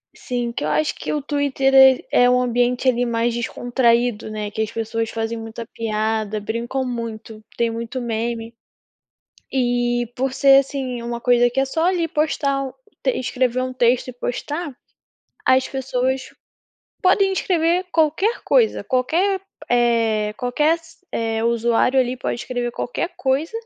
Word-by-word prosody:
Sim, 245 -1 -3
que - - -4
eu - - -1
acho 310 - +1
que - - -5
o 300 - -1
Twitter 280 -2 0
é 265 -1 +8 0.2
é 245 - +6
um 250 0 +3
ambiente, 245 +1 +1
ali, 245 -1 +3
mais 235 0 0
descontraído, 240 -1 0
né, 210 -1 -4
que 215 +1 -4
as 220 - -2
pessoas 225 0 -2
fazem 225 0 -3
muita 225 +1 -7
piada, 215 -1 -2
brincam 235 +5 -3
muito, 225 -3 -6
tem 235 -1 +2
muito 230 +3 -4
meme. 230 0 -3 1.0
E 240 -2 0
por 265 0 -1
ser, 270 0 +6
assim, 265 -3 -3
uma 235 0 -4
coisa 245 0 +4
que 255 +3 -1
é 270 - +2
só 320 +5 -1
ali 355 -2 +1
postar 295 -3 0
um 265 - -6 0.3
te 265 - +3
escrever 255 0 0
um 255 0 -2
texto 245 0 +2
e 255 - -6
postar, 285 +5 -4 0.7
as 260 0 +4
pessoas 260 0 -2 0.7
podem 385 +1 +4
escrever 350 -1 +1
qualquer 325 +8 +2
coisa, 475 -3 +3
qualquer, 345 +10 +1 0.3
eh, 230 -3 +2
qualquer 295 +6 +2
s 330 -1 -19
eh, 225 -1 -1
usuário 235 +2 +2
ali 255 0 +1
pode 250 - -3
escrever 245 -1 -3
qualquer 245 +8 -3
coisa 275 +6 0
245 Hz, 155 wpm, -21 LUFS, 230-270 Hz, 1.0 s, é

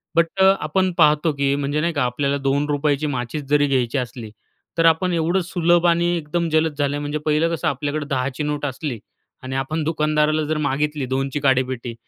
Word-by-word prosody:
but 170 - +5 0.2
अ, - - +7 0.2
आपण 185 +5 0
पाहतो 155 0 +4
की 140 0 0
म्हणजे 145 +2 -1
नाही 170 0 0
का 145 -3 0
आपल्याला 140 +3 0
₹2ची 145 +1 0
माचिस 135 +2 -3
जरी 145 0 +3
घ्यायची 130 -2 0
असली, 120 -3 -5 0.5
तर 165 - +3
आपण 165 +3 +3
एवढं 170 +3 +1
सुलभ 175 -1 +2
आणि 170 0 +3
एकदम 165 +1 -2
जलद 155 -1 +1
झाले 145 0 0
म्हणजे 145 +1 -3
पहिलं 155 +2 +2
कसं 165 - -3
आपल्याकडे 145 +1 -2
10ची 135 +2 -2
नोट 150 0 -2
असली 130 -3 -4 0.4
आणि 130 +1 -5
आपण 155 +4 -2
दुकानदाराला 155 0 +1
जर 155 +1 -1
मागितली 145 0 -1
2ची 135 +2 -2
काडेपेटी, 130 -3 0
150 Hz, 180 wpm, -21 LUFS, 135-155 Hz, 0.5 s, अ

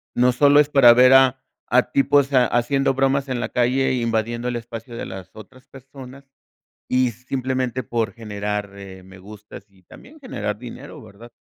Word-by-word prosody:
No 125 +1 +3
solo 145 +3 +4
es 150 - -2
para 125 -5 +6
ver 125 +2 +5
a 130 0 +4 0.3
a 125 +1 +1
tipos 140 0 +2
haciendo 130 +2 +1
bromas 135 +1 0
en 130 -2 -3
la - - -4
calle, 130 +2 0
invadiendo 115 0 -2
el 120 - -3
espacio 115 0 -8
de - - -6
las 95 -1 -10
otras 125 +4 -15
personas, 135 0 -14 0.6
y 125 -1 +1
simplemente 130 +1 -4
por 110 -3 -3
generar, 105 -2 -5
eh, 95 -1 -12
me 95 0 -15
gustas 105 0 -13
y 95 -2 -27
también 295 - -16
generar 105 - -5
dinero, 125 -1 -11
¿verdad? 115 +4 -15
125 Hz, 170 wpm, -21 LUFS, 110-135 Hz, 0.6 s, para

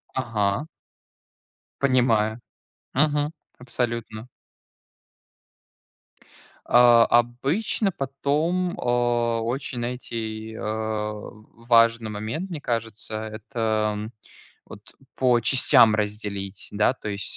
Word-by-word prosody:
Ага. 115 0 0 1.2
Понимаю. 120 -5 +2 0.6
Мгм. 145 +1 +2 0.3
Абсолютно. 120 -2 -4 2.4
А, 120 -1 +6
обычно 135 - +1
потом, 155 +6 -1
а, 120 -1 +1
очень, 125 +2 -3
знаете, 115 -2 -5
э, - - -8
важный 110 +2 0
момент, 110 - -4
мне 160 -4 -6
кажется, 115 -3 -3
это, 110 -1 -2 0.6
вот, 105 +2 -13 0.2
по 125 -2 +3
частям 115 -2 +5
разделить, 105 -2 -3
да, 105 +3 +3
то 125 - -8
есть 100 0 -3
115 Hz, 80 wpm, -24 LUFS, 110-125 Hz, 2.4 s, А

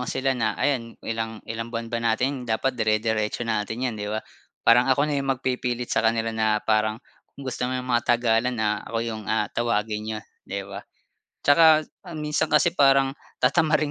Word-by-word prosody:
ko 125 - -4
sila 130 0 0
na 115 -4 -1
ayan, 125 -5 -1
"Ilang 115 -1 -4
ilang 115 +1 -5
buwan 115 0 -5
ba 115 - -1
natin 125 +3 0
dapat 125 +3 -1
dire-diretso 110 +1 0
natin 110 +2 -2
'yan." 125 - 0
'Di 105 -1 -5
ba? 110 +1 -3 0.4
Parang 120 +2 +5
ako 135 +2 +3
na 145 -2 0
yung 135 - -4
magpipilit 125 -1 -2
sa - - +3
kanila 115 0 +1
na 110 -1 +1
parang, 110 0 +2 0.4
"Kung 140 - -9
gusto 125 -1 -2
mo 130 - -2
matagalan 120 0 +2
na, 105 -1 0
ako 115 - -2
yung 110 -2 -4
ah 110 -1 +2
tawagin 110 -2 -1
n'yo." 110 -1 -3 0.3
'Di 100 0 -4
ba? 100 0 -8 0.6
Tsaka 155 +1 +6 0.3
minsan 150 0 -1
kasi 155 +3 +2
parang 135 -1 +5 0.3
tatamarin 150 +3 +3
115 Hz, 175 wpm, -24 LUFS, 110-130 Hz, 0.6 s, Tsaka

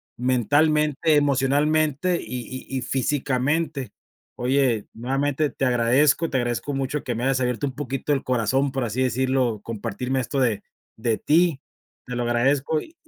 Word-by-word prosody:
mentalmente, 150 +5 +2
emocionalmente 145 +4 +2
y 125 -2 -6 0.2
y 135 - -4
y - - -2
físicamente. 135 +2 -1 0.5
Oye, 125 -3 +1
nuevamente 135 +5 -1
te 135 - -2
agradezco. 130 +6 +3
Te 135 - 0
agradezco 120 +3 -2
mucho 135 +2 -2
que 125 - -2
me 115 +2 -4
hayas 135 -1 +1
abierto 125 +3 0
un 130 - -6
poquito 135 +1 -2
el 135 - -1
corazón, 130 +3 +1
por 130 -2 -1
así 115 +4 -2
decirlo, 130 -2 0
compartirme 120 +4 -3
esto 135 +2 -2
de 110 -5 +1 0.3
de 110 -1 -1
ti, 165 -2 +2 0.5
te 125 - -5
lo 120 - -1
agradezco 135 +6 +1
y 320 - -11
135 Hz, 150 wpm, -24 LUFS, 125-145 Hz, 0.5 s, agradezco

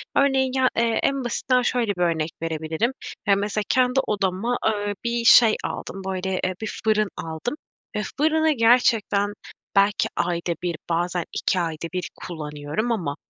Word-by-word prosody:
Örneğin 270 -2 +3
ya, 260 -1 +3
eee, 230 -1 +2
en 275 -2 +1
basitinden 250 +1 +1
şöyle 235 -4 0
bir 180 - -4
örnek 165 -2 +1
verebilirim: 160 +7 -1 0.4
Ya, 200 - +5
mesela 205 +1 -1
kendi 255 +1 +3
odama, 205 +4 0
ııı, 205 -1 0
bir 235 0 -1
şey 230 -2 +8
aldım, 195 - -5
böyle, 190 0 -2
eee, 185 0 0
bir 220 - -5
fırın 215 -1 +2
aldım 165 - -4 0.4
ve 210 - 0 0.2
fırını 315 +1 +3
gerçekten 225 -5 +3 0.4
belki 200 +1 +3
ayda 170 0 -1
1, 175 -2 -1
bazen 175 +1 0
2 185 - 0
ayda 165 -1 -3
1 180 -1 -3
kullanıyorum 150 +6 -4
ama 170 -11 -1
205 Hz, 155 wpm, -24 LUFS, 175-240 Hz, 0.4 s, şey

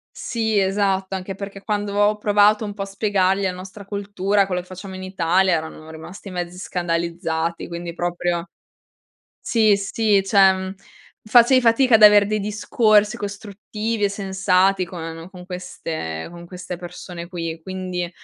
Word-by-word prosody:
Sì 220 -3 -1
esatto, 195 0 0
anche 190 0 -5
perché 200 0 -8
quando 205 -1 -2
ho 205 +1 +3
provato 210 +1 +3
un 205 - -5
po' 200 - -7
a 195 - -1
spiegargli 195 -1 +1
la 190 - +1
nostra 185 +2 -10
cultura, 200 0 0
quello 180 -1 -2
che 180 - -19
facciamo 185 +1 -9
in 185 - -7
Italia, 185 0 +2
erano 160 -1 -4
rimasti 170 +5 -10
mezzi 175 0 -5
scandalizzati 170 -2 -2
quindi 170 0 -6
proprio 175 0 -2 0.9
Sì, 215 -3 +3
sì, 200 0 +1
cioè 190 -1 +3 0.5
facevi 240 +3 +6
fatica 240 +1 +4
ad 215 - 0
avere 210 -1 +8
dei 215 +1 -1
discorsi 210 +1 +2
costruttivi 210 +1 -5
e 200 - +3
sensati 195 -1 +1
con 165 -1 -7
con 180 -1 -11
queste 160 - -5
con 170 0 -11
queste 180 0 -7
persone 175 0 -8
qui, 165 -2 -5
quindi 185 -1 -4
190 Hz, 150 wpm, -22 LUFS, 175-205 Hz, 0.9 s, avere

